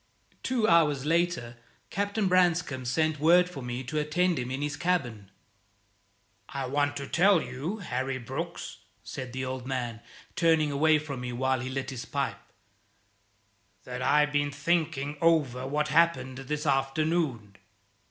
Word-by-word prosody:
Two 240 -4 +1
hours 150 -6 +4
later 160 -8 0 0.3
Captain 205 +1 0
Branscome 175 -7 +2
sent 155 +4 +1
word 175 +4 +5
for 155 -6 -8
me 125 +1 -4
to 155 +5 -2
attend 170 +3 +1
him 125 0 -3
in 135 +2 -3
his 145 0 -2
cabin. 125 - -1 1.2
"I 135 -1 -3
want 145 +2 0
to 140 - -4
tell 190 +1 +4
you, 140 +10 -4
Harry 130 - -3
Brooks," 120 -3 -6 0.3
said 130 -1 -6
the 130 +1 -3
old 130 -1 -5
man, 120 -4 -3 0.3
turning 160 -3 +3
away 155 +2 +4
from 145 -4 -5
me 125 0 -4
while 130 +1 +1
he 130 +2 -4
lit 135 0 -3
his 125 -2 -6
pipe, 140 -2 -2 1.4
"that 125 0 -6
I 150 +3 +4
have 150 0 +1
been 145 0 +1
thinking 150 -1 -1
over 140 -7 +2
what 150 +2 0
happened 155 -5 +2
this 150 +3 -4
afternoon." 135 -5 0
145 Hz, 150 wpm, -28 LUFS, 130-165 Hz, 1.4 s, word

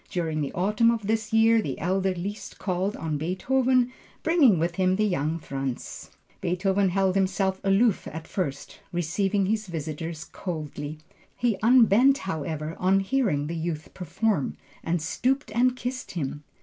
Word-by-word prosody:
During 165 -5 -1
the 140 - -2
autumn 210 +5 +3
of 230 -3 0
this 220 +1 -1
year, 225 0 +5
the 140 -10 -4
elder 190 +2 0
Liszt 200 +4 -6
called 190 +2 -1
on 155 -3 -2
Beethoven, 250 - +1 0.3
bringing 310 - +5
with 170 +2 -1
him 185 0 +3
the 215 +2 +2
young 165 -5 0
Franz. 135 -5 -5 0.3
Beethoven 190 +2 +1
held 190 0 +2
himself 190 0 0
aloof 195 +3 +3
at 160 +1 -7
first, 140 -8 -4
receiving 190 +4 0
his 215 +1 -1
visitors 160 -1 -5
coldly. 155 -3 -5 0.4
He 235 -5 +1
unbent 245 +3 +6
however, 160 - -4
on 190 +2 +3
hearing 195 - +1
the 165 +3 -4
youth 160 -1 -4
perform, 185 -2 -1 0.3
and 170 +1 0
stooped 250 - -1
and 250 +1 +3
kissed 255 +1 -5
him. 145 -1 -3
190 Hz, 150 wpm, -26 LUFS, 160-220 Hz, 0.4 s, unbent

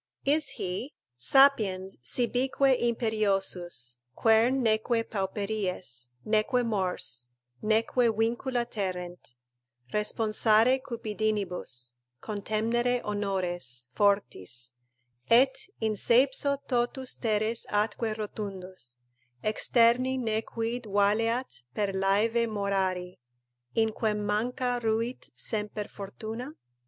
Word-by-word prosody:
Is 290 +1 +2
he: 190 +10 -4 0.2
"Sapiens, 195 - +3
sibique 255 - +2
imperiosus, 195 - 0 0.2
Quern 235 +4 +4
neque 225 +1 +1
pauperies, 190 - -3 0.2
neque 225 +4 +2
mors, 180 - -1 0.3
neque 225 +3 +2
vincula 240 +2 0
terrent; 180 - -5 0.6
Responsare 220 +3 +3
cupidinibus, 210 - -2 0.3
contemnere 225 +4 0
honores 180 -12 -3
Fortis; 125 - 0 0.6
et 260 +7 +4
in 220 -1 +1
seipso 265 +6 +3
totus 250 +1 -1
teres 220 0 0
atque 215 +1 0
rotundus, 185 - -6 0.4
Externi 240 +4 +3
ne 220 -3 0
quid 230 +2 -3
valeat 210 - +1
per 205 -2 0
laeve 210 +5 +2
morari; 190 -3 -1 0.6
In 225 -1 +3
quem 210 -1 -1
manca 245 +4 0
ruit 230 +2 -1
semper 210 -1 -2
fortuna?" 220 +7 -7
215 Hz, 85 wpm, -29 LUFS, 195-235 Hz, 0.6 s, Quern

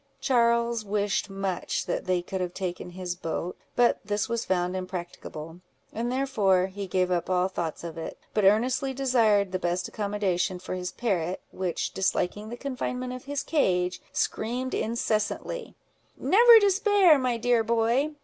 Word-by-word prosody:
Charles 235 -2 +2
wished 205 0 -1
much 195 -2 -2
that - - -2
they 180 -1 +1
could 190 +1 -4
have 180 -1 -3
taken 180 -2 -4
his 180 0 -4
boat; 170 0 -4 0.2
but 245 -1 +3
this 205 0 -1
was 235 -1 -2
found 180 0 0
impracticable; 175 -3 -6 0.3
and 235 +2 -2
therefore 215 -9 +2
he 200 0 -5
gave 185 0 +1
up 175 0 0
all 185 0 +2
thoughts 170 -4 -4
of 165 -1 -6
it: 160 - -6 0.2
but 210 - +1
earnestly 250 +7 +3
desired 225 -7 +3
the 185 - -1
best 175 0 -1
accommodation 200 -3 -1
for 180 - -6
his 180 0 -3
parrot, 185 -6 -1
which 185 -2 -2
disliking 195 +2 -1
the 240 - -6
confinement 255 -1 -4
of 255 +1 -8
his 285 0 -3
cage, 180 - +1
screamed 250 +4 -2
incessantly—"Never 395 - +2
despair, 400 -5 +5
my 250 -2 0
dear 240 0 +2
boy!" 235 +7 +1
205 Hz, 150 wpm, -27 LUFS, 185-245 Hz, 0.3 s, despair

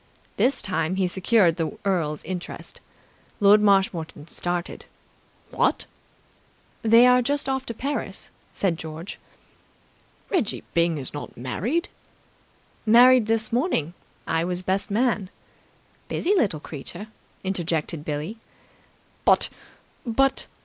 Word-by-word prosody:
This 265 +3 +1
time 180 -2 -1
he 190 -1 +1
secured 190 -1 +3
the 165 +6 -3
earl's 165 -6 0
interest. 180 -1 -7 0.6
Lord 205 0 +6
Marshmoreton 185 -6 +1
started. 175 0 -3 0.7
"What!" - - +1 1.0
"They 230 +2 +6
are 250 0 +6
just 285 +3 -1
off 265 0 -2
to 230 - -5
Paris," 280 +5 -4 0.2
said 175 -4 -1
George. 160 +3 -7 1.1
"Reggie 345 - 0
Byng 170 -1 +2
is 135 -3 -6
not 145 - -7
married!" 210 - -1 1.0
"Married 240 +1 +6
this 225 0 0
morning. 235 - 0 0.3
I 165 0 0
was 180 +1 -1
best 190 +2 0
man." 210 -3 +1 0.8
"Busy 380 - 0
little 205 - +1
creature!" 155 +7 -8 0.4
interjected 170 -4 -2
Billie. 155 +8 -4 0.9
"But - - +4 0.5
but 270 +3 +1
195 Hz, 110 wpm, -24 LUFS, 165-235 Hz, 1.1 s, Lord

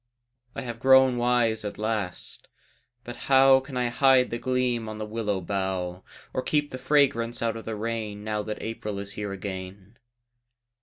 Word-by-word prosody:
I - - -4
have 120 -2 -6
grown 130 0 +6
wise 120 -2 +2
at 105 - -5
last 105 -4 -4 0.6
but 120 0 -7
how 135 0 +7
Can 130 0 -8
I 125 -1 +1
hide 130 +1 +4
the 120 - -3
gleam 125 -3 0
on 110 - -6
the 110 - -4
willow 105 -3 -2
bough, 95 -1 -3 0.3
Or - - -1
keep 145 +2 0
the 130 - -6
fragrance 130 -4 +2
out 115 -1 0
of 115 - -8
the 110 - -4
rain 110 -1 -4
Now 105 0 -2
that 105 +1 -6
April 105 -2 -4
is 100 0 -5
here 105 0 -5
again? 95 +2 -7
115 Hz, 170 wpm, -26 LUFS, 105-125 Hz, 0.6 s, how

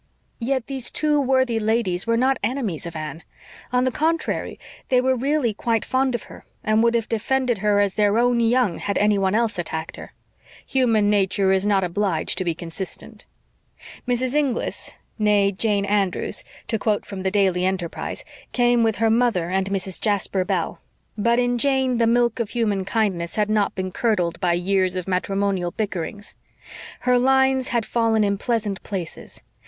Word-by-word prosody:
Yet 260 0 -1
these 265 -3 -2
two 300 -1 +1
worthy 260 -3 +2
ladies 215 -4 0
were 230 0 +2
not 265 +2 +2
enemies 220 - -2
of 170 - -8
Anne; 155 +1 -6 0.5
on 250 0 +2
the 255 - +1
contrary, 320 +4 -1 0.3
they 255 - +4
were 260 +1 +2
really 265 -2 0
quite 225 +1 -1
fond 260 -1 +1
of 235 - -4
her, - - -13 0.2
and 215 +1 +2
would 235 0 +3
have 230 -1 0
defended 245 +1 0
her 205 0 +2
as 200 -2 +2
their 210 0 +2
own 240 0 +3
young 235 -5 +2
had 200 - -2
anyone 200 -1 +2
else 230 -4 0
attacked 160 -1 -4
her. - - -10 0.5
Human 225 -6 +2
nature 195 -1 +2
is 190 +1 +2
not 195 -2 +3
obliged 180 -2 -1
to - - 0
be 170 -2 -1
consistent. 175 +3 -8 0.8
Mrs. 250 +1 0
Inglis 285 -5 -1 0.2
nee 205 -2 +3
Jane 200 0 0
Andrews, 200 -2 -1 0.2
to 225 - -1
quote 210 -1 0
from 195 -2 -7
the 190 - 0
Daily 190 -3 +2
Enterprise 185 -3 -3 0.3
came 240 -1 +3
with 225 -2 +2
her 225 +2 +2
mother 225 -7 +1
and 190 +1 0
Mrs. 190 -2 -3
Jasper 200 -3 +1
Bell. 180 -3 -2 0.3
But 235 +2 +2
in 245 0 +1
Jane 265 -2 +1
the 230 - +3
milk 240 +1 +2
of 230 -3 -1
human 210 -5 -1
kindness 190 -6 -1
had 210 0 +1
not 210 -2 +1
been 185 -1 -3
curdled 180 -7 0
by 175 -1 +2
years 185 +1 +1
of 185 -1 -4
matrimonial 190 -1 0
bickerings. 205 0 -5 0.7
Her 250 -1 +3
lines 265 0 +3
had 235 -3 0
fallen 225 -2 +1
in 200 -1 0
pleasant 215 -5 -1
places. 180 -5 -6
210 Hz, 170 wpm, -22 LUFS, 190-245 Hz, 0.8 s, they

